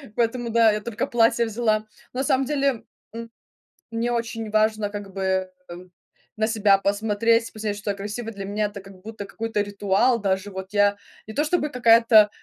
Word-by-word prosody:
поэтому 235 0 0
да, 230 -1 +5
я 210 - -1
только 210 0 -3
платье 235 0 +2
взяла. 220 -1 0 0.3
На 260 +2 -1
самом 265 0 +1
деле, 275 -4 0 0.3
м, 230 0 -7 0.6
мне 230 +1 -1
очень 230 -2 -3
важно 215 -1 +1
как 205 -2 -8
бы 190 -1 -1 0.9
на 220 0 +1
себя 210 -3 +4
посмотреть, 220 +3 +1
посмотреть, 210 -1 -4
что 205 0 -3
я - - -10
красивая. 215 +3 -5
Для 200 -2 -7
меня 210 +2 -1
это 200 -1 -8
как 195 -1 -15
будто 220 -1 -7
какой-то 225 +1 -2
ритуал, 205 +4 +1
даже 195 0 -1
вот 190 -1 -6
я 205 0 +3 0.3
не 220 - -8
то 295 - +1
чтобы 300 -2 0
какая-то, 230 -3 +6
215 Hz, 175 wpm, -24 LUFS, 205-230 Hz, 0.9 s, какая-то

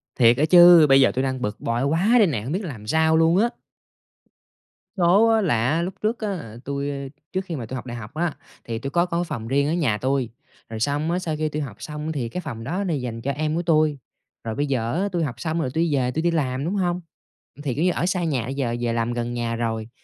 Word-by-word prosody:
Thiệt 120 -1 +5
á 150 - +3
chứ, 175 -1 +8
bây 135 0 +6
giờ - - +5
tui 130 - -1
đang 130 -1 -2
bực 105 -2 -3
bội 115 +2 -1
quá 165 +9 +1
đây 215 -5 +5
nè, 130 -10 -2
hông 125 +6 -5
biết 190 +6 -2
làm 120 - -7
sao 160 +5 +3
luôn 165 +2 +4
á! 230 +4 +3 1.5
Số 185 +6 +5
á, 225 -1 +3
là 120 - +1
á, 160 +4 +1
lúc 180 +2 -3
trước 220 +3 0
á 215 - -3
là 115 - -6
tui, 140 0 -2
a 140 -1 -5 0.3
trước 190 0 -1
khi 170 - -5
mà 120 - -5
tui 130 - -6
học 130 - -6
đại 120 -1 -6
học 105 +1 -9
á, 165 0 -1 0.3
thì 115 -1 -4
tui 135 - -4
có 170 +4 +2
có 175 -1 -1
phòng 140 -10 -5
riêng 140 +3 +1
ở 155 - 0
nhà 140 -12 +1
tui, 130 0 -1 0.4
rồi 110 -1 -6
xong 145 +7 0
á 180 - 0
sau 165 -4 -3
khi 155 0 -1
tui 150 +1 -3
học 130 -8 -6
xong 150 +1 -5
thì 130 -7 -3
cái 180 - -4
phòng 120 -9 -7
đó 180 - -2
nó 180 -4 -1
dành 125 -5 -4
cho 140 - -1
em 155 +2 -2
của 170 - 0
tui, 155 -3 +2 0.5
rồi 110 -1 -4
bây 145 - 0
giờ 120 -4 -1
á 200 - 0
tui 175 -2 0
học 130 -6 -3
xong 160 +5 -2
rồi 130 - -1
tui 165 - +1
đi 160 -4 +1
về, 125 -2 +1
tui 160 - -2
đi 170 +1 +1
làm, 135 -4 -1
đúng 180 +5 -1
hông? 180 -2 0 0.6
Thì, 135 -5 -2
kiểu 155 - 0
như, 180 - +3
ở 170 - -1
xa 180 -1 0
nhà, 140 -8 0
bây 135 +2 -5
giờ 125 -4 -1
về 120 -1 0
làm 115 +1 -1
gần 120 0 -3
nhà 120 -1 -2
rồi, 115 -1 -3
145 Hz, 275 wpm, -23 LUFS, 120-170 Hz, 1.5 s, chứ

